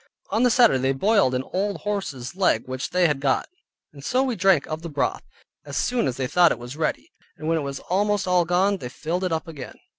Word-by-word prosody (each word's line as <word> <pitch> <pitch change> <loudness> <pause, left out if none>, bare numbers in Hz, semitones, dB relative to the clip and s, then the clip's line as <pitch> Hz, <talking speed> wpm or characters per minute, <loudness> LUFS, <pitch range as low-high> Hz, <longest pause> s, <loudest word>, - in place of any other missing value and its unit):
On 220 +3 +1
the 250 - +5
Saturday 235 - +5
they 135 +1 +1
boiled 195 - +2
an 125 - -1
old 200 +2 -1
horse's 170 -10 -4
leg 180 - +2
which 130 0 -4
they 180 0 +2
had 150 -4 +1
got, 135 -1 0 0.5
and 140 -2 -13
so 255 - +1
we 255 -3 -1
drank 185 -6 +3
of 155 0 -5
the 170 - -6
broth, 140 -4 -1 0.4
as 140 -2 -6
soon 245 - +1
as 125 - -3
they 130 - -1
thought 175 +6 +4
it - - -1
was 120 +3 -8
ready, 155 0 -2 0.3
and 155 - -6
when 165 0 +2
it - - -3
was 140 -1 -5
almost 205 +1 0
all 180 -1 +3
gone, 185 +4 +2
they 125 -9 -7
filled 165 +8 -3
it 185 - -1
up 160 0 -2
again. 145 -6 -8
165 Hz, 240 wpm, -24 LUFS, 135-195 Hz, 0.5 s, the